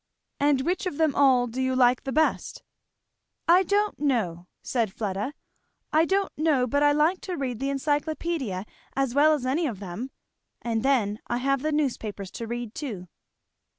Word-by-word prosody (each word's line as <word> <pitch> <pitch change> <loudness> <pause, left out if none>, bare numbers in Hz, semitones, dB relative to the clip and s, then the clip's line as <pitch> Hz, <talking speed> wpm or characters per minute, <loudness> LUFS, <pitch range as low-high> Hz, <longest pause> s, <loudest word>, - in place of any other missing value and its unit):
"And 285 -2 +3
which 360 +6 -1
of 290 - -4
them 315 -3 +2
all 260 -3 +4
do 245 +2 -4
you 260 0 0
like 250 0 +3
the 270 - -2
best?" 315 +3 0 0.8
"I 350 +3 +7
don't 410 +3 0
know," 205 - -1 0.2
said 230 -6 0
Fleda, 205 +6 -3 0.6
"I 315 +1 +5
don't 390 +2 0
know 300 -5 +2
but 285 +4 0
I 290 0 +5
like 310 +5 +2
to 365 -3 -4
read 255 -5 -3
the 275 - -1
Encyclopædia 290 - -1 0.3
as 270 -2 0
well 295 +3 +5
as 285 -4 -2
any 300 +6 +1
of 220 -8 -5
them. 200 +7 -6 0.5
And 230 -2 -1
then 225 -6 +1
I 240 - -1
have 275 +1 0
the 310 +2 -1
newspapers 225 -10 -2
to 230 - -6
read 240 -1 -5
too." 205 - -6
270 Hz, 175 wpm, -26 LUFS, 235-305 Hz, 0.8 s, I